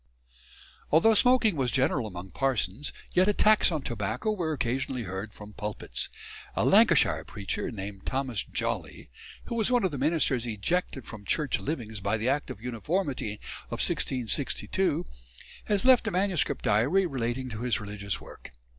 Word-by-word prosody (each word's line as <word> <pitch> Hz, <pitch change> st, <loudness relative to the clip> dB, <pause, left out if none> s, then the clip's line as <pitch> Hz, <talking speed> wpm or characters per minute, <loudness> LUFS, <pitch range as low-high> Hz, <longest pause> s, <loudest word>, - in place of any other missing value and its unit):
Although 165 Hz, +9 st, +6 dB
smoking 230 Hz, -2 st, +5 dB
was 130 Hz, -4 st, 0 dB
general 130 Hz, -2 st, +1 dB
among 90 Hz, -1 st, -8 dB
parsons, 135 Hz, -2 st, -1 dB, 0.2 s
yet 185 Hz, +2 st, +4 dB
attacks 210 Hz, -1 st, +4 dB
on 155 Hz, -4 st, -2 dB
tobacco 120 Hz, -, -2 dB
were 175 Hz, -6 st, -1 dB
occasionally 130 Hz, -2 st, -1 dB
heard 95 Hz, +2 st, -5 dB
from 105 Hz, 0 st, -11 dB
pulpits. 105 Hz, -, -4 dB, 0.5 s
A -, -, +1 dB
Lancashire -, -, +5 dB
preacher 100 Hz, -2 st, -4 dB
named 100 Hz, -3 st, -7 dB
Thomas 130 Hz, -6 st, -1 dB
Jollie, -, -, -4 dB, 0.3 s
who -, -, -6 dB
was 230 Hz, -1 st, +2 dB
one 245 Hz, -3 st, +3 dB
of 190 Hz, -, +1 dB
the 140 Hz, -, -4 dB
ministers 135 Hz, -7 st, +1 dB
ejected 130 Hz, -, -1 dB
from 110 Hz, -2 st, -9 dB
Church 150 Hz, +5 st, 0 dB
livings 115 Hz, -8 st, -4 dB
by 100 Hz, +2 st, 0 dB
the 115 Hz, +4 st, 0 dB
Act 145 Hz, +2 st, 0 dB
of -, -, -7 dB
Uniformity, 125 Hz, -, -2 dB, 0.3 s
1662, 125 Hz, -5 st, 0 dB, 0.6 s
has 205 Hz, +2 st, +1 dB
left 255 Hz, -3 st, +6 dB
a -, -, +3 dB
manuscript 185 Hz, -3 st, 0 dB
diary 135 Hz, -, +3 dB
relating 130 Hz, -3 st, -2 dB
to 110 Hz, -1 st, -6 dB
his 125 Hz, -1 st, 0 dB
religious 100 Hz, -2 st, -4 dB
work. -, -, -12 dB
130 Hz, 150 wpm, -28 LUFS, 105-170 Hz, 0.6 s, Although